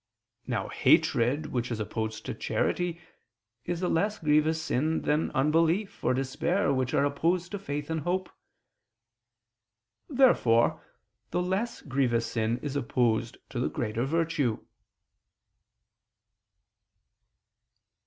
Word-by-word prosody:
Now - - -1
hatred 125 +6 +2
which 125 -1 -1
is 115 -3 -3
opposed 110 0 -4
to - - -3
charity 175 -1 -1 0.7
is 175 +1 -3
a - - +2
less 205 +6 +1
grievous 155 +1 +2
sin 160 0 0
than 150 +2 +1
unbelief 165 +8 +1
or 125 - +2
despair 140 +6 0
which 130 -2 0
are 140 - +3
opposed 170 +5 0
to 205 - -4
faith 145 -6 -4
and 160 - 0
hope. 180 +3 -1 1.8
Therefore 240 - +4 0.5
the 180 - 0
less 195 +6 -2
grievous 125 -4 +1
sin 115 0 -1
is 145 -2 -3
opposed 120 -4 0
to 120 - -3
the 125 - 0
greater 115 0 -2
virtue. 150 -5 0
145 Hz, 115 wpm, -28 LUFS, 125-170 Hz, 1.8 s, Therefore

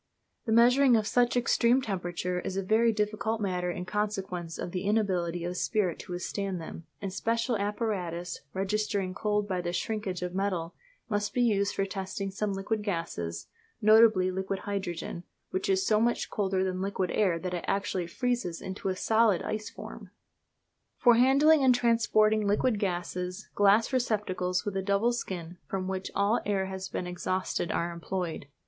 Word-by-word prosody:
The - - 0
measuring 245 +3 +6
of 215 - 0
such 245 +2 +2
extreme 240 +1 +3
temperatures 180 -5 -3
is 190 - -3
a 195 - 0
very 225 +4 +3
difficult 215 +1 -1
matter 180 -3 -1
in 180 +1 -4
consequence 190 -5 -3
of 175 - -5
the 180 - -2
inability 185 -5 0
of 175 +1 -3
spirit 185 -5 0
to 180 - -7
withstand 190 +1 -3
them, 165 0 -8 0.2
and 195 -2 -3
special 230 +4 0
apparatus, 200 -5 -2
registering 195 0 -1
cold 210 +1 0
by 185 -2 -1
the 175 0 -2
shrinkage 185 0 -3
of 180 0 -3
metal, 185 -3 -1 0.3
must 205 -1 -2
be 250 - +3
used 200 -4 +1
for 195 - +1
testing 195 0 -4
some 205 +2 -2
liquid 195 +3 -2
gases, 165 - -3 0.3
notably 215 -3 +6
liquid 190 +1 -3
hydrogen, 185 -4 -4 0.3
which 185 - -2
is 190 0 +2
so 215 0 +3
much 240 +1 0
colder 190 -2 0
than 185 -1 -2
liquid 190 -2 -1
air 185 -5 +2
that 180 +2 -4
it 175 - -3
actually 195 -3 -1
freezes 240 -4 -2
it - - -10
into 190 +1 -3
a 185 - -1
solid 220 -2 +3
ice 215 0 -3
form! - - -10 0.9
For 245 - +6
handling 275 +5 +5
and 255 -2 +6
transporting 220 -3 +3
liquid 210 +2 +2
gases 180 0 -3
glass 205 +5 +4
receptacles 190 -7 0
with 205 -2 -3
a 195 - 0
double 200 +5 +2
skin 175 -6 -5
from 190 -1 -3
which 190 0 -3
all 200 +4 +2
air 195 -2 0
has 190 0 -5
been - - -3
exhausted 180 0 -2
are 170 +1 -1
employed. 170 -3 -4
195 Hz, 170 wpm, -29 LUFS, 180-215 Hz, 0.9 s, measuring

